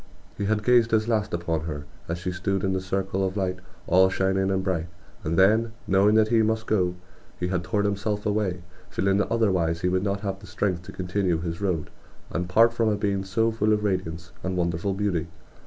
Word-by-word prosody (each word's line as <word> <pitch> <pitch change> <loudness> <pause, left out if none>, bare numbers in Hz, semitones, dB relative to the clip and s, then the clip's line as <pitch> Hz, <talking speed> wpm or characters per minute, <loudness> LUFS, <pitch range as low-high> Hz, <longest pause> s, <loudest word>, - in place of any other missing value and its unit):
He 100 - -3
had 105 +1 0
gazed 120 -2 +4
his 110 -1 +2
last 110 -3 0
upon 85 -2 -2
her 75 -3 -5 0.2
as 85 - -2
she 90 +1 -3
stood 95 +2 -1
in 95 -1 +1
the 95 - -1
circle 95 +1 -1
of 95 +1 -1
light 95 -1 -1 0.3
all 95 +1 +5
shining 95 0 +1
and 95 -1 0
bright; 85 -4 -1 0.4
and 80 +2 -1
then, 110 +4 +4
knowing 100 +3 +4
that 110 -1 +4
he 115 -1 +4
must 110 0 0
go, 90 -5 +1 0.4
he 90 - -1
had 90 -2 -1
torn 100 +2 0
himself 105 +1 -1
away, 100 -4 -1 0.3
feeling 95 0 +1
that 100 - 0
otherwise 90 -8 +1
he 90 - +1
would 95 0 +1
not 100 0 -1
have 95 -2 -3
the 100 - -13
strength 90 0 -1
to - - -8
continue 90 -1 0
his 85 +2 -4
road, 90 -6 -1 0.4
and 90 +1 -2
part 115 +5 +5
from 115 -1 +1
a 105 - +2
being 100 -1 -1
so 115 +4 +1
full 110 -1 +1
of 105 0 0
radiance 85 -4 -2
and 95 0 -2
wonderful 85 +3 0
beauty. 95 -5 -1
95 Hz, 215 wpm, -25 LUFS, 90-105 Hz, 0.4 s, all